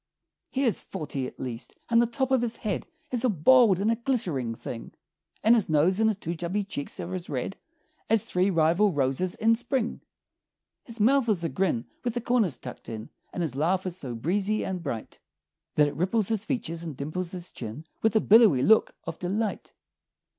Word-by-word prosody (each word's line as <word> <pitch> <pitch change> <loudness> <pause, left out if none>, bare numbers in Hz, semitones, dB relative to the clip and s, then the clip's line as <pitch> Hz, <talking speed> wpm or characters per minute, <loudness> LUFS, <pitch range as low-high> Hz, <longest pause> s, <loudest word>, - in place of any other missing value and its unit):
He 270 - -1
is 235 -5 +2
forty, 145 -7 -4
at - - -13
least; 125 -1 -6
and 230 0 +4
the 235 - +2
top 265 +2 -1
of 260 -2 +4
his 235 -1 -2
head 205 -4 -3 0.2
Is 245 -1 0
a 255 - +3
bald 210 - +5
and 210 +3 +2
a - - +2
glittering 190 - -1
thing; 115 0 -7 0.5
And 225 - +6
his 225 -7 +2
nose 160 +6 +3
and 220 0 +4
his 215 - -1
two 170 -4 -4
chubby 175 +5 -2
cheeks 170 -8 -6
are 180 - -4
as 180 -2 -5
red 135 +7 -3 0.5
As 225 -1 +3
three 185 +2 +1
rival 170 +3 +3
roses 145 +6 0
in 225 +1 +3
spring. 240 +1 -1 0.8
His 230 -1 -6
mouth 250 +3 +4
is 190 -5 +1
a 165 - 0
grin 165 -12 0 0.2
with 240 -1 -2
the 240 - -1
corners 225 - +1
tucked - - -9
in 110 -1 -7 0.2
And 175 - -2
his 145 -6 -3
laugh 180 +6 +1
is 180 -2 -3
so 130 -9 -6
breezy 195 - 0
and 185 -2 -3
bright 120 -9 -5 0.6
That 150 -1 +5
it 145 - -5
ripples 190 +6 +1
his 220 -1 -1
features 170 -11 -2
and 160 -6 -6
dimples 165 +5 -3
his 180 -1 -7
chin 120 +7 -7 0.2
With 220 0 +2
a 220 - +5
billowy 205 - +6
look 220 +6 +4
of - - -6
delight. 200 +4 -2
185 Hz, 200 wpm, -27 LUFS, 155-225 Hz, 0.8 s, And